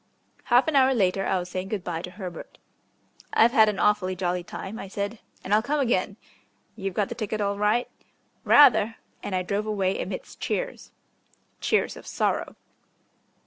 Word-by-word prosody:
Half 245 +3 +4
an 315 - 0
hour 265 -1 +5
later 195 -3 +1
I - - +1
was 180 0 -4
saying 185 +1 -4
good 200 -2 -3
bye 170 -2 -3
to 180 - -7
Herbert. 180 -2 -9 0.8
"I've 230 +1 +5
had 220 -2 +5
an 205 - -3
awfully 205 -3 +2
jolly 180 -1 -1
time," 195 +5 -7
I - - -7
said, 200 +3 -4 0.2
"and 195 - -2
I'll 215 - +5
come 290 +6 -1
again." 210 -6 0 0.6
"You've 195 -3 -4
got 205 -2 0
the - - -3
ticket 215 -1 -4
all 200 -1 -1
right?" 215 +4 +2 0.6
"Rather!" 225 -6 +6 0.3
and 190 - -4
I 185 - 0
drove 205 +3 -2
away 195 -3 0
amidst 185 0 -7
cheers. - - -3 0.7
Cheers 435 - +1
of - - -12
sorrow. - - -1
205 Hz, 175 wpm, -26 LUFS, 185-225 Hz, 0.8 s, Rather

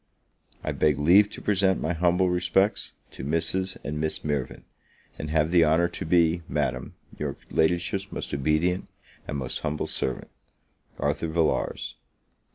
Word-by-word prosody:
I - - -1
beg 75 -3 +2
leave 90 +8 +6
to - - -10
present 95 -2 +2
my 80 - -1
humble 90 +2 +2
respects 90 +3 +1 0.2
to - - -8
Mrs. 85 +6 -1
and 75 +1 -3
Miss 80 0 -1
Mirvan; 75 -4 -2 0.6
and 75 - -4
have 80 +1 +2
the 85 -2 +6
honour 80 +2 +3
to - - -6
be, 85 0 +3
Madam, - - -2 0.2
your - - -3
Ladyship's 90 +4 +1
most - - -5
obedient 75 +6 +1 0.4
and 70 - -3
most 65 -1 -3
humble 75 -1 -2
servant, 65 - -3 0.7
ARTHUR 75 +3 -1
VILLARS. 80 -1 -1
80 Hz, 145 wpm, -26 LUFS, 75-90 Hz, 0.7 s, leave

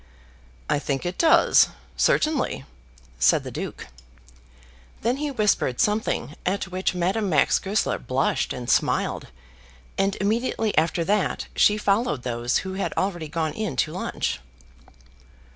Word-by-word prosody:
"I - - +1
think 140 +1 -3
it 175 +1 -4
does, 325 - +5 0.3
certainly," 280 - +1 0.5
said 65 - +4
the - - -7
Duke. - - -6 1.2
Then 240 +4 +1
he 295 +1 -2
whispered 210 - +1
something 210 -7 0
at 190 +1 -1
which 185 0 -1
Madame 190 +4 0
Max 150 -5 +3
Goesler 205 +2 -1
blushed 130 +2 0
and 125 -1 -5
smiled, - - +1 0.7
and 195 0 +1
immediately 220 +1 0
after 165 +2 +2
that 205 +2 0
she 210 - +4
followed 205 - 0
those 120 0 0
who 190 - -4
had 195 - -2
already 175 -4 -1
gone 155 0 -2
in 215 -10 -3
to - - 0
lunch. 65 - -2
190 Hz, 130 wpm, -24 LUFS, 150-215 Hz, 1.2 s, does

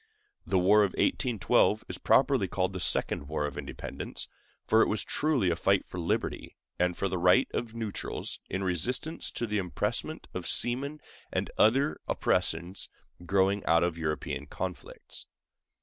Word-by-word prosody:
The 95 - +2
war 100 +4 +5
of 100 -3 +1
1812 120 -6 +2
is - - -3
properly 130 -7 +3
called 95 +1 -1
the 95 - -4
Second 70 -4 +1
War 75 0 -1
of 75 - -5
Independence, - - -6 0.4
for - - +4
it - - +4
was - - 0
truly 135 - +1
a - - +1
fight 95 +3 +2
for 90 - -7
liberty 85 - -2 0.2
and 90 -1 +1
for 100 - 0
the 95 -1 -2
rights 90 +1 +4
of 115 -1 -3
neutrals, 110 -3 -4
in 95 +1 -2
resistance 120 - 0
to 120 - -3
the 105 -2 -1
impressment 90 -3 -2
of - - -4
seamen 140 +5 +1 0.3
and - - -2
other 135 +7 +3
oppressions 85 +4 -1 0.4
growing 100 +1 +2
out 85 +1 +4
of 85 -1 0
European 80 -2 -3
conflicts. - - -7
95 Hz, 155 wpm, -29 LUFS, 90-115 Hz, 0.4 s, war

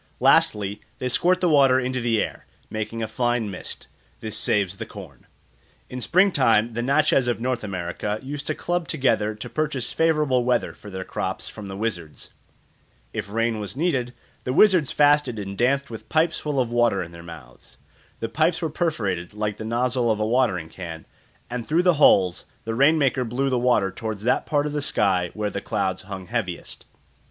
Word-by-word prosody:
Lastly, 105 0 +3 0.2
they 125 - -2
squirt 180 +8 +2
the 180 - +3
water 135 -5 +5
into 125 0 -2
the 115 -2 +1
air, - - -8 0.2
making 110 +1 -3
a - - -2
fine 120 -1 -1
mist. 90 - -8 0.3
This 110 -1 -4
saves 100 -3 0
the - - -5
corn. - - -12 0.6
In 125 0 -5
spring 185 - +4
time 115 -7 +3
the 120 - -2
Natchez 135 0 +3
of 120 - 0
North 125 0 -2
America 100 +2 -3
used 145 +2 -6
to 155 - -1
club 175 -1 -2
together 115 -8 +1
to 105 - -7
purchase 150 -5 -2
favourable 150 -6 +2
weather 125 -1 +1
for 105 - -12
their 95 -1 -5
crops 95 0 -4
from 105 -2 -8
the 95 0 -6
wizards. 90 -8 -5 0.8
If - - -4
rain 115 +1 0
was 105 +4 -6
needed, 135 -7 0 0.3
the 125 - -2
wizards 180 -5 +5
fasted 145 -5 +3
and 100 -1 -5
danced 135 +4 +1
with 110 -1 -9
pipes 160 +1 +2
full 150 -3 -2
of 120 -2 0
water 120 -5 +2
in 85 - -10
their 85 0 -11
mouths. 75 -8 -12 0.4
The 115 - -1
pipes 155 +9 +1
were 160 -3 -2
perforated 105 - -2
like 105 -1 -2
the 110 - -6
nozzle 120 +1 0
of 110 -1 +1
a 105 - +1
watering 110 -9 +1
can, 80 -2 -8 0.4
and 120 -1 -5
through 165 +3 +2
the 180 -1 +5
holes 90 -9 +5 0.2
the 115 - -2
rain 140 +7 +4
maker 135 -3 +2
blew 130 +3 -1
the 125 - +2
water 120 -6 +2
towards 105 +1 -5
that 125 - +1
part 145 -1 +1
of 150 - -3
the 150 - -1
sky 95 -9 +1
where 105 -1 -2
the 100 - -4
clouds 95 -3 -1
hung 95 -1 -7
heaviest. 100 -5 -4
120 Hz, 190 wpm, -24 LUFS, 105-140 Hz, 0.8 s, water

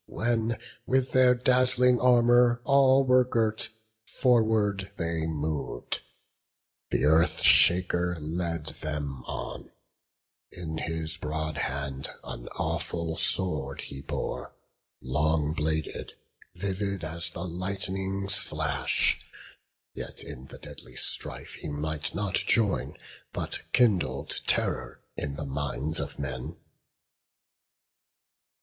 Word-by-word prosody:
When 115 0 0 0.3
with 130 0 +2
their 125 -1 +6
dazzling 125 0 +4
armour 120 -1 +5
all 135 0 +5
were 130 0 +6
girt, 110 -3 0 0.3
Forward 110 -6 +2
they 85 -1 -1
mov'd; 75 -1 -3 0.9
th' - - +1
Earth 80 +2 +3
shaker 90 0 +5
led 85 0 -3 0.2
them 75 -4 -4
on: - - -6 0.8
In 80 -2 -5
his 80 -1 -2
broad 80 -1 -3
hand 70 0 -2
an - - -7
awful 85 -1 -2
sword 80 -5 +1
he 70 -1 -7
bore, - - -4 0.5
Long 75 +3 +1
bladed, 80 0 -2 0.4
vivid 100 -1 -2
as 85 +2 -1
the 85 - -6
lightning's 95 +2 -1
flash: 75 -5 +1 0.7
Yet - - -5
in 65 +1 -9
the - - -11
deadly - - -9
strife - - -4
he - - -5
might 75 0 -2
not 100 -2 -1
join, 105 -2 +1 0.4
But - - -4
kindled 85 - +2
terror 60 -1 0
in 70 -1 -3
the 75 - -5
minds 70 +2 -2
of - - -5
men. 70 +3 -4
85 Hz, 105 wpm, -28 LUFS, 75-110 Hz, 0.9 s, their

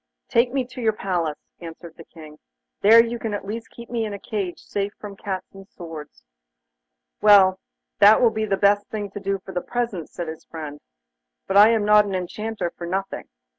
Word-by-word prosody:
'Take 240 0 +3
me 265 -1 -1
to 250 0 -9
your 220 -2 +2
palace,' 175 -7 -3
answered 165 0 -10
the 165 - -12
King; 155 -2 -14 0.4
'there 230 +3 +7
you 235 0 -5
can 220 -2 -3
at 200 - -6
least 225 +3 -6
keep 235 0 -12
me 235 -2 -2
in 210 -2 -4
a - - -9
cage 195 -5 -4
safe 200 0 -4
from 205 -1 -8
cats 195 -1 -5
and 195 0 -13
swords.' 160 - -10 1.0
'Well, 195 -3 +6 0.4
that 210 +2 +7
will 235 -2 +4
be 220 0 -2
the 200 -2 0
best 205 +1 +3
thing 205 -2 -5
to 205 - -6
do 195 0 -1
for 190 - -8
the 180 -1 -2
present,' 230 -9 -3
said 175 - -6
his 160 0 -7
friend. 150 -3 -8 0.7
'But 195 - +1
I 210 +2 +9
am 225 -2 +2
not 210 0 +6
an 195 -2 -3
Enchanter 185 0 -4
for 170 - -7
nothing. 195 +2 -4
200 Hz, 205 wpm, -23 LUFS, 180-220 Hz, 1.0 s, I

